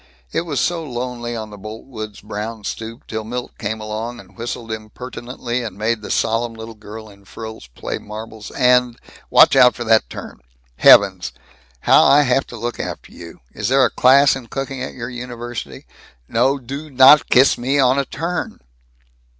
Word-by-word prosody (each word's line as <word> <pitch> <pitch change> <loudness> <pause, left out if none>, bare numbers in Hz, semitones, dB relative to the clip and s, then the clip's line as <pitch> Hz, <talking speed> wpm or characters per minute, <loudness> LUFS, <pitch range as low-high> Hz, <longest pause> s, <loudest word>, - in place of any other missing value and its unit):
It 170 +1 -2
was 145 -4 -1
so 170 -2 0
lonely 120 -3 -5
on 110 -2 -6
the 105 - -11
Boltwoods' 110 0 -8
brown 105 +1 -6
stoop 115 +3 -6
till 110 0 -4
Milt 120 +3 -6
came 110 0 -3
along 110 +3 -5
and - - -16
whistled 115 -1 -6
impertinently 120 +2 -5
and 110 -4 -6
made 110 +1 -1
the - - -8
solemn 115 +1 0
little 110 0 -9
girl 110 +1 -10
in 100 -1 -17
frills 110 - -9
play - - -4
marbles 110 0 -9
and 125 -1 +2 0.3
Watch - - +6
out 125 0 +6
for 120 - -5
that 110 -1 +3
turn! - - -9 0.4
Heavens, - - +6 0.5
how - - +6
I 145 +1 +6
have 130 0 +1
to 120 - -9
look 120 +2 -4
after - - -6
you! 85 -6 -12
Is 105 - -3
there 135 0 +5
a 120 - 0
class 135 +2 +5
in 130 -3 -8
cooking 135 0 -5
at 130 - -5
your 115 -2 -5
university? 120 -1 -7 0.4
No 130 +5 +2
do 140 +4 -7
not 135 +2 +7
kiss 130 +3 +5
me 130 +4 -1
on 130 0 +4
a 140 - 0
turn!" 170 +6 -4
120 Hz, 175 wpm, -19 LUFS, 110-130 Hz, 0.5 s, not